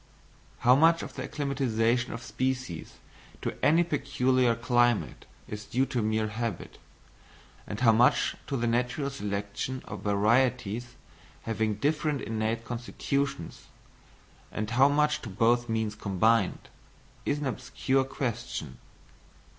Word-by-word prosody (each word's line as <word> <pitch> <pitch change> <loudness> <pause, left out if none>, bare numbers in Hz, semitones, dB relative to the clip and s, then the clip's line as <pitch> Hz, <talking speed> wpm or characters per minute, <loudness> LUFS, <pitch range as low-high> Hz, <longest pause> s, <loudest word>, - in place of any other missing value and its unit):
How 125 +1 +6
much 165 +3 +4
of - - -7
the - - -5
acclimatisation 125 -4 0
of 115 +1 -6
species 130 -10 -3 0.5
to - - -2
any 165 +4 +5
peculiar 130 -5 +1
climate 120 -1 +1 0.2
is 105 0 -6
due 130 +3 +1
to 130 -3 -2
mere 110 0 0
habit, 110 -3 -4 0.9
and 105 - -5
how 115 -3 +7
much 120 +3 +3
to 140 - -1
the 120 - -1
natural 125 +4 0
selection 105 +2 -4
of - - -7
varieties 120 +2 +1 0.5
having 110 -1 -1
different 150 +4 0
innate 110 +1 -2
constitutions, 125 -2 -3 0.8
and 105 +1 -3
how 130 +4 +5
much 150 +1 +2
to 115 - -7
both 120 +4 +2
means 110 -2 0
combined, 105 +1 +1 0.5
is 145 - 0
an 145 - -4
obscure 130 +1 0
question. 120 - -4
120 Hz, 125 wpm, -28 LUFS, 110-135 Hz, 0.9 s, how